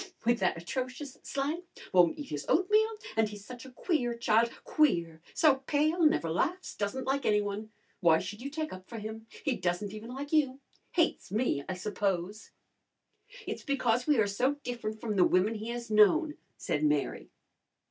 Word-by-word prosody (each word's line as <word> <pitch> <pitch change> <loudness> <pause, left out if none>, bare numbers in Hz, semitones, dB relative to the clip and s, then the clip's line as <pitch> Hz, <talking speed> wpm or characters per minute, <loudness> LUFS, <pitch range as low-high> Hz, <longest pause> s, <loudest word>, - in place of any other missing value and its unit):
"With 240 0 +3
that 180 -3 +1
atrocious 255 - -5
slang! 285 +5 -2 0.3
Won't 175 -2 +5
eat 290 - -7
his 145 -1 -5
oatmeal! 425 +5 +4 0.3
And 220 -1 +2
he's 205 -1 -10
such 250 +1 -9
a - - -12
queer 250 -4 0
child 235 0 +3
queer! 170 - +1
So 300 -5 +5
pale, 310 +4 +2
never 300 - +4
laughs, 340 - -1
doesn't 210 +6 -3
like 275 +1 0
any 210 -3 +3
one. 205 +1 -4 0.3
Why 165 -3 +5
should 210 +6 -6
you 275 - -4
take 310 +1 -4
up 185 0 -11
for 230 - -6
him? 220 +1 -7 0.2
He 275 -4 +2
doesn't 185 +2 -2
even 215 +2 -8
like 285 +4 -6
you. 275 -4 +2 0.3
Hates 335 - +1
me, 210 - 0
I 185 - -2
suppose." 195 0 -2 1.0
"It's - - -4
because 250 -3 0
we 295 -3 +4
are 220 - +4
so 245 +8 +1
different 220 -3 -4
from 215 -3 -2
the 180 - +6
women 185 +6 +3
he 220 +1 -5
has 235 -1 -5
known," 295 +10 +5 0.2
said 150 - -2
Mary. 150 -1 0
230 Hz, 180 wpm, -30 LUFS, 200-280 Hz, 1.0 s, the